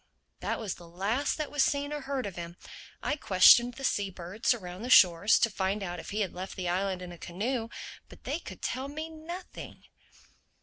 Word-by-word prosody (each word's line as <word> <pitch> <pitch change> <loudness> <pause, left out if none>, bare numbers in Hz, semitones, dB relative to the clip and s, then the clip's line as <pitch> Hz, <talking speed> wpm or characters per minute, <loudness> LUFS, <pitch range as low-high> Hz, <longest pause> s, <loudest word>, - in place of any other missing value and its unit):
That - - -2
was 215 -5 -3
the 175 - -13
last 200 +11 -1
that 305 -2 -3
was 290 -2 +3
seen 285 +1 0
or 295 - -4
heard 270 -1 -3
of 195 -3 -5
him. 170 0 -7 0.5
I - - 0
questioned 240 +1 +6
the 270 - -9
sea 205 -6 +1
birds 190 +5 -2
around 185 -5 -3
the 245 - -5
shores 185 -1 +7
to - - +4
find 195 +1 -1
out 175 -2 -4
if - - -8
he 210 +2 -2
had 195 - -1
left 185 +2 -6
the 180 -2 -3
island 185 +1 -1
in 180 - -8
a 175 - -11
canoe. 225 +6 -3 0.4
But - - -15
they - - -2
could - - -11
tell 260 +2 -2
me 310 +3 -5
nothing." 340 +4 -9
205 Hz, 210 wpm, -29 LUFS, 180-265 Hz, 0.5 s, shores